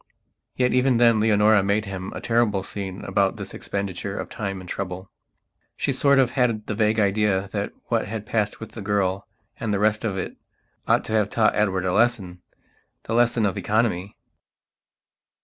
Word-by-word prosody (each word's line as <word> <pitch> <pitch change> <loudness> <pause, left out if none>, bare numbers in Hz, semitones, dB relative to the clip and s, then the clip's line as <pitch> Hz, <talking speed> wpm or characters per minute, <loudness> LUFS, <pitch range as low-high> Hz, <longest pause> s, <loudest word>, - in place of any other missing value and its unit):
Yet 125 -1 +1
even 125 -1 +3
then 115 -2 +5
Leonora 105 -1 +4
made 100 +2 0
him 95 -1 -6
a - - -6
terrible 115 -4 +1
scene 95 -1 -6
about 95 0 +1
this - - -7
expenditure 100 0 -4
of - - -5
time 100 -3 -4
and 90 - -11
trouble. 95 0 -5 0.7
She - - 0
sort 140 -1 +3
of 130 -2 +3
had 120 -5 0
the - - -3
vague 110 +1 +1
idea 100 -1 +1
that - - -3
what - - 0
had 105 0 -5
passed 105 -2 -1
with 110 - -8
the 110 - -8
girl 100 -1 -1 0.3
and 110 - -2
the 100 - +1
rest 105 +2 +1
of 100 -4 -2
it 90 - -5 0.5
ought - - +3
to 110 - -4
have 105 -2 +2
taught 110 0 +2
Edward 95 -3 +1
a 90 - +1
lessonthe 105 -6 +1 0.7
lesson 120 -1 +3
of 100 0 -1
economy. 105 -1 0
105 Hz, 175 wpm, -24 LUFS, 95-110 Hz, 0.7 s, then